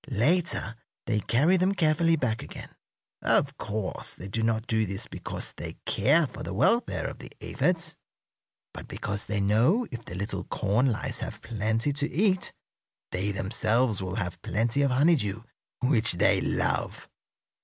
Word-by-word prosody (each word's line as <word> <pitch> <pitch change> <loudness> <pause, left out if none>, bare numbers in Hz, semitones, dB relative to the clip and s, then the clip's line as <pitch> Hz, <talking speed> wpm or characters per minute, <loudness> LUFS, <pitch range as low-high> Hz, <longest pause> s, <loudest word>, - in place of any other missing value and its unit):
Later 135 - +1 0.3
they 110 -3 +1
carry 150 - +3
them 185 +2 +2
carefully 165 -1 +3
back 120 -7 -1
again. - - -9 0.5
Of 140 0 +3
course, 105 -2 -2
they 95 - -8
do 110 +3 -2
not 110 0 0
do 110 -2 +1
this 100 +3 -2
because - - -4
they - - -7
care 155 +4 +4
for - - -9
the 95 - -5
welfare 230 - +2
of - - -5
the - - -10
aphids, 175 -2 -1 0.8
but - - -9
because 100 0 -4
they 105 -1 -1
know 115 - +3
if 120 -2 -6
the 90 - -8
little 95 -1 -3
corn 110 +6 +1
lice 110 - -2
have - - -6
plenty 110 +4 -1
to 145 +1 -1
eat 190 0 +1 0.6
they 95 +3 -1
themselves 110 +3 +1
will 95 0 -4
have 90 -5 -4
plenty 115 +8 0
of 140 - +3
honeydew, 125 - +2 0.4
which 125 -6 +3
they 85 - +3
love." - - -1
115 Hz, 155 wpm, -27 LUFS, 105-145 Hz, 0.8 s, care